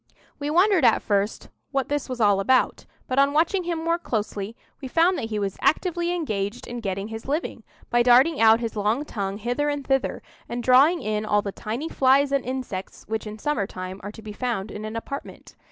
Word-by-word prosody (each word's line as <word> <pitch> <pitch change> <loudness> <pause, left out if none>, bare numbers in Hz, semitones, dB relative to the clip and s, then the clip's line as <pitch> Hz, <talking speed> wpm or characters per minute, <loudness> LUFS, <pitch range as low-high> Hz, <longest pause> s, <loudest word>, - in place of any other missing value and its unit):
We 290 0 -2
wondered 365 +3 +4
at - - +4
first 205 0 -1 0.2
what 275 -2 -1
this 290 -2 -2
was 255 -1 -4
all 205 -3 +4
about; 255 +6 +2 0.2
but 260 +1 0
on 280 +1 +4
watching 345 +4 +2
him 340 -1 -1
more 335 +1 +1
closely, 210 -5 -3 0.3
we 265 - -5
found 335 +7 +3
that 225 - -4
he 215 - -2
was 200 -2 -3
actively 345 +1 +1
engaged 225 - -2
in 240 0 -6
getting 195 -1 -3
his 225 +2 -7
living, 300 +5 -2 0.3
by 240 - +4
darting 250 +5 +5
out 225 +1 +6
his 230 -1 -3
long 215 +7 0
tongue 200 -6 -4
hither 245 +7 -1
and 290 -1 -3
thither, 270 -1 0 0.3
and 240 0 -3
drawing 280 +8 +5
in 215 0 -1
all 210 -1 +1
the 200 - -3
tiny 230 +10 -4
flies 275 -1 +3
and 275 -1 +1
insects 250 -7 -5
which 220 +1 -3
in 210 0 -7
summer 225 -6 -1
time 185 0 -7
are 205 - -6
to 220 - -12
be 215 -1 -7
found 225 -4 -3
in 210 +1 -6
an 215 +1 -6
apartment. 275 +5 -7
240 Hz, 210 wpm, -24 LUFS, 210-290 Hz, 0.3 s, out